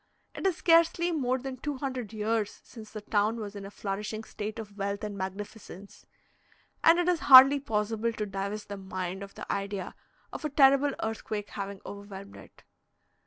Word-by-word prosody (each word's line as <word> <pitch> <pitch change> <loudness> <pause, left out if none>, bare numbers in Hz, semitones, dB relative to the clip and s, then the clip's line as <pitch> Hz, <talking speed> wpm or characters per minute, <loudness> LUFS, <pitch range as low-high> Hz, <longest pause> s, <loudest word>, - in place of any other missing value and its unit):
It - - -1
is 370 - +1
scarcely 335 +1 +4
more 260 -5 0
than 260 0 -6
two 290 +2 -4
hundred 255 -5 -4
years 220 -1 -1
since 220 -3 -12
the 215 - -7
town 210 +2 +1
was 205 -1 -6
in 200 -1 -7
a - - -9
flourishing 210 +2 -4
state 215 0 -6
of 210 -3 -8
wealth 200 +1 -3
and 210 -1 -4
magnificence, 200 0 -8 0.8
and 330 +1 +7
it 350 0 +1
is 355 -2 +2
hardly 270 0 +9
possible 225 -2 -1
to 215 -1 -3
divest 200 +2 -4
the 200 - -5
mind 190 -1 -5
of 200 0 -9
the - - -7
idea 200 -1 -4 0.4
of - - -6
a 305 - -1
terrible 275 0 +5
earthquake 215 -1 -4
having 200 -1 -6
overwhelmed 200 -1 -9
it. - - -16
215 Hz, 175 wpm, -29 LUFS, 200-260 Hz, 0.8 s, hardly